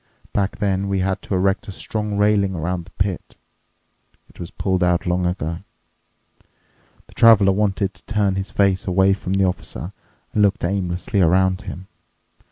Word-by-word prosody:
Back 100 -1 -1
then 100 -1 0
we 95 -1 0
had 95 0 -1
to 100 - -3
erect 95 +3 0
a - - -5
strong 105 +1 -4
railing 100 -2 +2
around 85 +1 -3
the 95 - -17
pit. 95 -2 -3 0.9
It - - -21
was 85 - -6
pulled 95 -2 -1
out 90 0 +1
long 90 0 0
ago." 85 -2 -3 1.5
The - - -19
Traveler 110 -4 +6
wanted 100 0 0
to - - -17
turn 105 -3 +1
his 95 +1 -3
face 100 -2 +1
away 95 +1 +3
from 95 -1 -4
the 95 0 +3
Officer 90 -1 -4 0.4
and 105 - +2
looked 100 -3 +2
aimlessly 95 +1 -1
around 95 +2 +3
him. 95 -1 -8
95 Hz, 165 wpm, -21 LUFS, 90-100 Hz, 1.5 s, Traveler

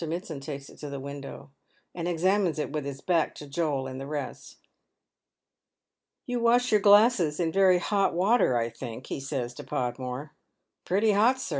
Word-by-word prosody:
Mitsand 165 -3 -5
takes 140 -1 -7
it - - -16
to 145 - -6
the 140 -1 -5
window, 140 0 -8 0.4
and 170 -1 -4
examines 180 0 +1
it 150 - -3
with 150 -2 -3
Iub 140 -1 -7
back 170 -4 +1
to 150 - -9
Joel 140 -2 -1
and 130 0 -6
the 135 - -6
rest. 145 -1 -6 0.9
" - - -62
You 245 -2 -2
wash 240 +2 +3
your 210 -1 +4
glasses 205 -6 +5
in 165 -2 +1
very 190 0 +5
hot 195 0 +1
water, 185 - +3
I 115 0 -1
think," 120 +1 -8
he - - -4
says 135 -3 -4
to - - -9
Podmore. 125 +3 -4 0.3
" - - -56
Pretty 205 +4 +3
hot, 230 +6 +3
sir. - - -5
155 Hz, 185 wpm, -27 LUFS, 140-195 Hz, 0.9 s, glasses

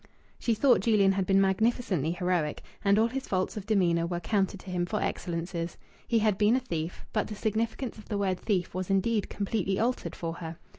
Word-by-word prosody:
She 230 - +1
thought 260 +3 +5
Julian 205 -4 +4
had 195 -1 -1
been 195 0 +4
magnificently 195 - +1
heroic, 180 -4 -1 0.2
and 200 0 +4
all 220 - +5
his 260 +3 -3
faults 185 -1 -1
of 210 -2 -6
demeanour 170 -6 +2
were 175 0 -2
counted 195 +2 0
to 185 - -8
him 180 -1 0
for 210 - -1
excellences. 170 -1 -3 0.3
He 235 - +2
had 215 -3 +2
been 215 +3 +5
a - - +3
thief; 170 -9 -4
but 215 - +1
the 215 - -6
significance 225 +3 -2
of 215 - -14
the 210 - -1
word 190 -2 0
"thief" 190 -5 -1
was 185 +1 -3
indeed 200 +2 +1
completely 195 -2 -1
altered 245 +3 -1
for 165 -1 -4
her. 165 -1 -6
195 Hz, 205 wpm, -29 LUFS, 180-220 Hz, 0.3 s, thought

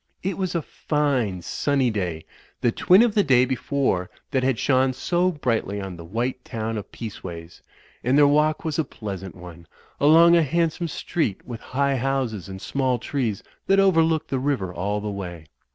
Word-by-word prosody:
It 190 +2 -1
was 185 -3 -2
a 165 - 0
fine, 130 - -1
sunny 135 +1 0
day, 90 -6 -3 0.4
the 120 - +3
twin 185 - +5
of 235 -3 +2
the 205 - +4
day 130 -5 +4
before 130 -7 -1 0.2
that 130 -3 +1
had 130 -2 +1
shone 130 0 +2
so 175 +7 +1
brightly 115 - -1
on 95 -2 -6
the 85 - -10
white 120 +8 -3
town 115 0 -4
of 105 - -11
Peaceways; 90 -7 -8 0.4
and 130 +3 +3
their 145 - +7
walk 155 +5 +2
was 160 0 -1
a - - +3
pleasant 95 - -7
one, 85 -2 -12 0.3
along 165 +4 +7
a 170 - +5
handsome 165 +2 0
street 155 - -2
with 120 -3 -7
high 140 +1 0
houses 125 -8 -2
and 95 0 -7
small 130 -2 0
trees 120 -4 -2 0.2
that 195 0 +4
overlooked 165 -5 +3
the 135 - -1
river 125 -10 -1
all 105 +4 -2
the 105 0 -3
way. 90 -5 -6
130 Hz, 180 wpm, -24 LUFS, 100-150 Hz, 0.4 s, their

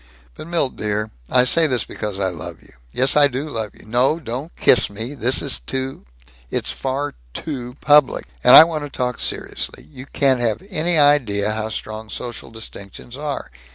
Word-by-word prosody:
But, 155 - -10
Milt 165 -6 -1
dear 105 0 -2 0.2
I 125 - +4
say 160 +6 +4
this 125 -5 +1
because 105 -2 -5
I 95 -1 +1
love 85 -5 -8
you. - - -19 0.2
Yes, 130 - +2
I 145 -1 +7
do 135 +3 -4
love 110 -7 -4
you. - - -16
No, 125 +8 +1
don't 135 +3 -6
kiss 125 - +4
me. 110 +6 -6
Yes, 125 +3 +3
it - - -2
is - - +1
too 130 - -5 0.4
It's - - -2
far 135 - -3 0.2
too 125 -5 -6
public. 150 -2 +4 0.2
And 125 - +8
I - - +12
want 160 -2 -3
to 145 - -6
talk 125 -2 -3
seriously. - - -3
You 135 -2 -12
can't 135 -3 +1
have 115 - -1
any 170 -1 +1
idea 125 -9 +3
how 110 0 -3
strong 110 0 -6
social 120 +1 -7
distinctions 110 +1 -8
are. 145 0 -5
125 Hz, 190 wpm, -20 LUFS, 110-145 Hz, 0.4 s, I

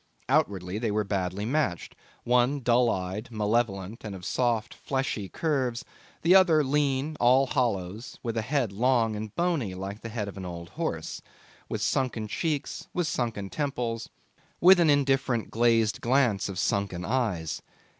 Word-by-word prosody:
Outwardly 95 0 +1
they 115 -1 -1
were 105 +1 +1
badly 100 0 -2
matched: 120 - -1 0.3
one 125 +3 +2
dull 120 0 +3
eyed, 95 +5 -3
malevolent, 110 -2 -1
and 105 -3 -5
of 90 -2 -9
soft 120 -3 0
fleshy 130 -7 -3
curves; 130 -7 -1 0.4
the 170 +3 +5
other 175 -5 +6
lean, 145 +1 0
all 130 +3 +5
hollows, 110 -4 -2
with 115 -2 -2
a 115 - +1
head 125 -2 0
long 115 +1 +2
and 105 0 -6
bony 160 - 0
like 100 +3 -6
the 115 - -6
head 105 -2 -3
of 100 - -8
an 95 - -6
old 85 -1 -7
horse, - - -4 0.5
with - - -2
sunken 120 -5 0
cheeks, 150 - -3
with 175 - +1
sunken 115 -9 -2
temples, 120 -6 -2 0.5
with 185 +1 +7
an 165 -3 +4
indifferent 135 -4 +2
glazed 115 -2 +2
glance 120 -6 +2
of 95 - -6
sunken 95 -2 -1
eyes. 105 - -1
115 Hz, 155 wpm, -27 LUFS, 100-135 Hz, 0.5 s, with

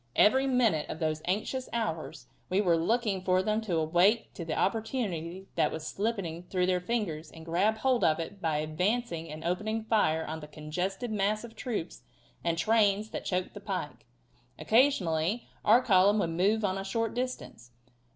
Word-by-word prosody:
Every 265 +5 +5
minute 230 - +2
of - - -4
those 155 -1 -1
anxious 220 +8 -2
hours 165 - -3 0.2
we 185 - +2
were 180 -5 +3
looking 205 +3 0
for 185 0 +2
them 215 +2 0
to 190 -7 -1
awake 175 +8 +2
to 170 - -6
the 160 -1 -3
opportunity 195 -5 -2
that - - +2
was 160 -1 -5
slipping 195 -5 -2
through 180 0 -1
their 180 0 +2
fingers 180 -7 -2
and 160 -1 -12
grab 190 +7 +1
hold 255 +1 +1
of 155 0 +3
it 190 +4 -6
by 160 -3 0
advancing 170 +3 -1
and 155 +1 -8
opening 215 +6 -1
fire 185 -8 +2
on 160 +1 -5
the 150 - -9
congested 180 - -4
mass 210 +1 0
of 230 -1 -10
troops 215 -7 -4 0.4
and 170 -1 0
trains 210 +2 +2
that - - -5
choked 180 -1 -1
the - - -8
pike. - - -5 0.5
Occasionally 215 - +2 0.2
our 235 +4 +5
column 200 -1 +5
would 170 -5 0
move 205 +6 +2
on 190 0 -1
a - - -4
short 225 +3 -1
distance. 245 - -5
190 Hz, 175 wpm, -29 LUFS, 165-220 Hz, 0.5 s, Every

